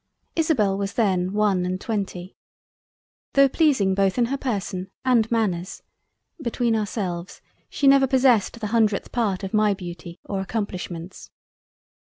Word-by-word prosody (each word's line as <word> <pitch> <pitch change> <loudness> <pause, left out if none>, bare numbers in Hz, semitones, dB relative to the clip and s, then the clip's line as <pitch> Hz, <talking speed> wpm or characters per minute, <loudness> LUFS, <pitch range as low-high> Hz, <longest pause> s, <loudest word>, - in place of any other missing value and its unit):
Isobel 230 -12 +1
was 200 0 -3
then 185 -5 +1
one 205 -3 +1
and 185 +1 -2
twenty. 195 -4 -4 1.0
Tho' 275 0 +6
pleasing 265 - +2
both 195 +1 +1
in 245 - +3
her - - +2
Person 200 -7 -3 0.2
and 235 -4 +3
Manners 195 -6 -1 0.6
(between 235 -2 0
ourselves) 190 -4 -3 0.3
she 285 - -2
never 275 0 +6
possessed 250 -4 +3
the 220 - -4
hundredth 215 -3 +1
part 210 -5 -1
of 195 - -5
my 210 -1 +3
Beauty 175 -2 -9
or 195 -1 -3
Accomplishments. 185 -4 -5
205 Hz, 135 wpm, -23 LUFS, 185-235 Hz, 1.0 s, Tho